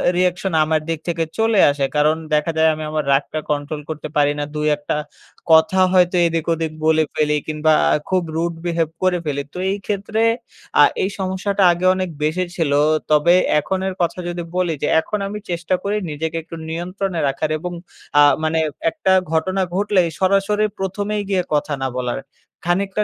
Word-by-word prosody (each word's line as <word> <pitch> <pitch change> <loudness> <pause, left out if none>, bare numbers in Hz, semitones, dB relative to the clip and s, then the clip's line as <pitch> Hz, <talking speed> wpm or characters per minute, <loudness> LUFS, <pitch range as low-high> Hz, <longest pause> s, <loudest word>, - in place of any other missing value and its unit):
Reaction 180 0 0
আমার 155 0 +1
দিক 165 -2 -1
থেকে 170 -1 0
চলে 225 -2 +2
আসে। 140 -1 0
কারণ 150 +1 +3 0.2
দেখা 150 +2 +2
যায় 160 0 +5
আমি 155 0 -5
আমার 155 -1 -1
রাগটা 145 +3 0
কন্ট্রোল 150 +1 -2
করতে 155 -1 -5
পারি 145 -1 +3
না। 145 - -1
দুই 150 0 0
একটা 145 - -3 0.6
কথা 160 +3 +5
হয়তো 180 0 +4
এদিক-ওদিক 165 -1 -1
বলে 160 0 +4
ফেলি 150 0 +2
কিংবা 155 0 +2 0.4
খুব 185 -1 +2
rude 170 0 -1
behave 165 -2 -1
করে 185 -1 +3
ফেলি। 140 -2 -1
তো - - -8
এই 200 - -1
ক্ষেত্রে 210 +2 -2 0.6
আ - - +10 0.2
এই 190 - 0
সমস্যাটা 190 +1 0
আগে 175 +2 -2
অনেক 185 -1 -2
বেশি 160 +4 0
ছিল। 160 -5 0 0.4
তবে 150 +3 +5 0.3
এখনের 190 +3 -2
কথা 175 +1 0
যদি 175 0 -4
বলি, 180 -2 +1
যে - - +2
এখন 210 +6 -3
আমি 210 +1 -5
চেষ্টা 175 +1 0
করি 200 +1 -1
নিজেকে 160 +2 -3
একটু 165 - -9
নিয়ন্ত্রণে 180 +2 -3
রাখার 155 +3 -1
এবং 180 +3 -5 0.5
আ - - +8 0.2
মানে 160 +1 +1 0.3
একটা 190 +3 0 0.2
ঘটনা 185 +4 0
ঘটলেই 195 -3 +2
সরাসরি 200 +2 +2
প্রথমেই 205 +2 -2
গিয়ে 190 -2 +2
কথা 145 0 0
না 135 - +1
বলার। 125 0 -2 0.5
খানিকটা 195 +4 0
170 Hz, 170 wpm, -20 LUFS, 155-190 Hz, 0.6 s, আ